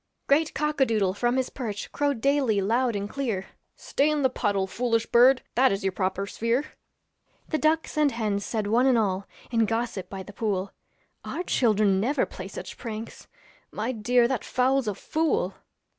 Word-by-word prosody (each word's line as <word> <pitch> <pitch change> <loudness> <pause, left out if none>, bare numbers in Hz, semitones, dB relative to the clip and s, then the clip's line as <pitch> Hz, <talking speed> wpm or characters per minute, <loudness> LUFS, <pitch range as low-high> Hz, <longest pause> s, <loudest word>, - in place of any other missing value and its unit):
Great 305 +3 +2
cock 300 0 -1
a - - +7
doodle 205 -5 +1
from 240 +5 0
his 260 -1 -1
perch 215 -6 -5
Crowed 285 -5 -1
daily 275 -6 +2
loud 230 +4 +1
and 200 0 -2
clear, 220 -7 -3 0.3
'Stay 285 +2 0
in 300 -2 0
the 260 - +3
puddle, 200 -5 0
foolish 230 +3 0
bird, 250 +2 +5
That 260 +2 +4
is 195 0 -2
your 190 - +1
proper 190 +1 -1
sphere.' 230 +7 -1 0.8
The 310 - 0
ducks 310 0 +1
and 295 -2 +4
hens 210 -4 -1
said, 215 -1 -2
one 235 +5 +3
and 255 -3 +4
all, 195 -3 0 0.2
In 230 -2 +3
gossip 225 -5 -2
by 190 -1 -6
the 205 - -12
pool, 200 -3 -2 0.5
'Our 350 - -4
children 215 - +2
never 265 +8 +1
play - - -8
such - - -8
pranks; 225 -2 -7 0.4
My 220 +4 -2
dear, 240 +1 +2
that 255 -3 -2
fowl's 260 0 +1
a 205 - -1
fool.' 295 - 0
230 Hz, 180 wpm, -26 LUFS, 205-265 Hz, 0.8 s, a